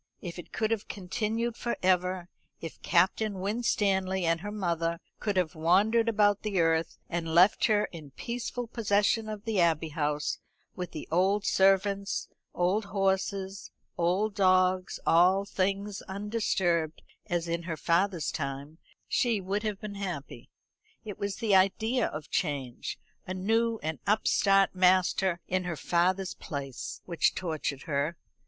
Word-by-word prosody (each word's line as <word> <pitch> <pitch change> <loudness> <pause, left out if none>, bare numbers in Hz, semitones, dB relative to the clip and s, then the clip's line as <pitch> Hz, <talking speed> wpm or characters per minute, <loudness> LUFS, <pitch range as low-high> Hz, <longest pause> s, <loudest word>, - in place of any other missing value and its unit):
If 175 -1 -7
it 175 - -10
could 220 0 -1
have 220 -2 -1
continued 220 +4 -2
for 240 - -3
ever, 180 -1 +1 0.3
if 165 - -8
Captain 210 +2 +2
Winstanley 190 -3 0
and 165 0 +1
her 205 +2 -5
mother 170 -4 -1 0.2
could 205 -3 -1
have 180 -4 +1
wandered 205 +8 +3
about 205 -2 +3
the 205 -4 -1
earth, 165 0 +1
and 165 -1 -3
left 180 +4 +6
her 210 -1 +3
in 155 -4 -10
peaceful 240 - -4
possession 215 -1 +1
of 215 0 -6
the 220 -4 0
Abbey 165 -1 +2
House, 150 -1 -1 0.4
with 180 -2 -4
the 155 - -7
old 195 +4 +2
servants, 195 +1 +2 0.3
old 185 +4 +1
horses, 195 0 -1 0.3
old 185 +5 +1
dogs, 185 -1 +2
all 185 +4 +4
things 195 +1 -1
undisturbed 190 -5 -1 0.2
as 175 -1 -1
in 170 0 -1
her 160 - -2
father's 170 +1 +1
time, 140 +2 -5 0.3
she 235 -4 +1
would 195 +2 -2
have 210 -2 -3
been 210 -2 -6
happy. 185 -8 -6 0.6
It 205 -2 -7
was 200 -1 -2
the 225 -4 0
idea 220 +6 +3
of 150 0 -7
change, 140 -7 -2 0.3
a 185 - -3
new 225 +4 +1
and 155 -3 -3
upstart 195 -2 +3
master 185 -1 +3
in 185 0 -1
her 170 -3 -3
father's 185 +4 +1
place, 140 -5 -6
which 170 -2 +1
tortured 155 -6 -3
her. 150 +3 -1
190 Hz, 145 wpm, -29 LUFS, 170-205 Hz, 0.6 s, left